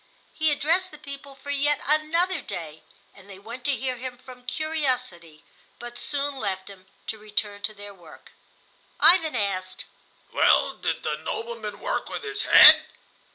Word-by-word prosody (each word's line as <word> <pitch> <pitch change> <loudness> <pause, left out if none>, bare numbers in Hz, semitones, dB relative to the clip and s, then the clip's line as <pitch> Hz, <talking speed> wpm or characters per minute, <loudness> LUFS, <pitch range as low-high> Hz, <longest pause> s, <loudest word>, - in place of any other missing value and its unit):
He 315 -1 +1
addressed 330 +6 +1
the 300 - -13
people 280 -1 -10
for 285 +1 -8
yet 290 +1 +1
another 325 +5 +1
day, 160 -2 -8 0.3
and 200 0 -18
they 195 - -11
went 230 +5 -10
to 285 -1 +2
hear 255 +1 -3
him 250 0 -7
from 250 -1 -15
curiosity, 255 - -3 0.3
but 240 0 -9
soon 285 -1 -2
left 195 -4 -4
him 190 -1 -16 0.2
to 220 - -5
return 210 -1 -4
to 215 +1 -3
their 205 0 -11
work. 175 -5 -17 0.7
Ivan 325 -4 +5
asked, 185 -4 -2 0.5
"Well, - - +3
did - - -3
the - - -2
nobleman 475 +2 -6
work - - -3
with - - -6
his 420 -1 -4
head?" - - +10
255 Hz, 155 wpm, -25 LUFS, 205-305 Hz, 0.7 s, head